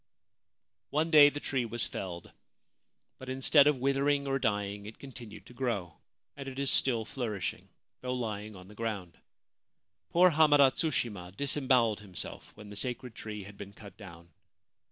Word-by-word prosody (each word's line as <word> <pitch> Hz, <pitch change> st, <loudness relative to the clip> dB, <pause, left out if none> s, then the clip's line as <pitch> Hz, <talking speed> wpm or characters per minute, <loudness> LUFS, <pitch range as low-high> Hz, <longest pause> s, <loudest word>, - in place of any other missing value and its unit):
One 155 Hz, +3 st, 0 dB
day 150 Hz, -2 st, +9 dB
the 145 Hz, -, -6 dB
tree 135 Hz, -3 st, -1 dB
was 120 Hz, +1 st, -1 dB
felled; 85 Hz, -3 st, -6 dB, 0.9 s
but, 130 Hz, -, -8 dB
instead 135 Hz, +2 st, +5 dB
of 150 Hz, -2 st, +3 dB
withering 140 Hz, +2 st, +1 dB
or 135 Hz, 0 st, 0 dB
dying, 105 Hz, -3 st, -1 dB
it 110 Hz, -, -10 dB
continued 115 Hz, -7 st, -10 dB
to -, -, -14 dB
grow, 115 Hz, -10 st, -2 dB, 0.4 s
and 140 Hz, -1 st, -8 dB
it 130 Hz, -, -10 dB
is 140 Hz, -1 st, +1 dB
still 115 Hz, -4 st, +2 dB
flourishing, 110 Hz, -5 st, -4 dB, 0.3 s
though 125 Hz, 0 st, -2 dB
lying 110 Hz, -3 st, -4 dB
on 90 Hz, 0 st, -12 dB
the 105 Hz, -, -13 dB
ground. 105 Hz, -6 st, -4 dB, 0.9 s
Poor 180 Hz, +1 st, +5 dB
Hamada 145 Hz, -3 st, +6 dB
Tsushima 105 Hz, -, -2 dB
disembowelled 130 Hz, -6 st, +2 dB
himself 95 Hz, -6 st, -6 dB
when 105 Hz, -1 st, -11 dB
the -, -, -8 dB
sacred 125 Hz, +2 st, -4 dB
tree 105 Hz, -2 st, -7 dB
had 100 Hz, +1 st, -12 dB
been 100 Hz, 0 st, -8 dB
cut 100 Hz, -1 st, -13 dB
down. 85 Hz, -5 st, -12 dB
120 Hz, 155 wpm, -31 LUFS, 105-135 Hz, 0.9 s, day